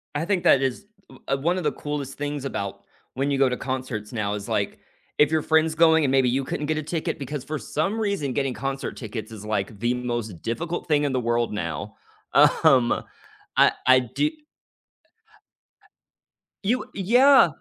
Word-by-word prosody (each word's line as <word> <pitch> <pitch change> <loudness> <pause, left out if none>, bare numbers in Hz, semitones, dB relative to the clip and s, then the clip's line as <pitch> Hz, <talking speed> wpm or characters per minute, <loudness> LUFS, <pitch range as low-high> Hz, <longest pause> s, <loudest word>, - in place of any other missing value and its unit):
I 150 +3 -1
think 190 -1 0
that 135 - +5
is, 135 +9 -2 0.4
l 135 0 0
one 175 +5 +1
of 185 - -3
the - - +1
coolest 145 -2 -5
things 145 -1 -4
about 100 -7 -4 0.3
when 135 +2 0
you 140 - +1
go 135 -1 +4
to 125 - -2
concerts 130 -4 -4
now 105 -3 -1
is, 105 -1 -5
like, - - -1 0.4
if 150 0 +4
your 160 -1 +2
friend's 160 +1 +2
going 160 0 +5
and 130 - +1
maybe 135 -2 +3
you 135 +3 0
couldn't 145 +2 -3
get 155 0 0
a 155 - -2
ticket, 160 +1 -3
because 140 0 -5
for 155 0 -4
some 195 +9 -2
reason, 200 - -1
getting 135 -1 -1
concert 135 +1 -4
tickets 110 -1 -6
is, 105 -2 -9
like, 105 0 -2
the 120 +3 +1
most 120 -7 -4
difficult 165 +9 -3
thing 150 -2 +2
in 140 - 0
the 130 - +1
world 120 -2 0
now, 85 -7 -4 0.4
um, 125 -3 +4 0.5
I - - +6
I 130 0 +7
do 130 - -1 2.3
You 235 +6 +1
Uh, - - -17
yeah. 250 +6 +6
135 Hz, 185 wpm, -24 LUFS, 120-155 Hz, 2.3 s, I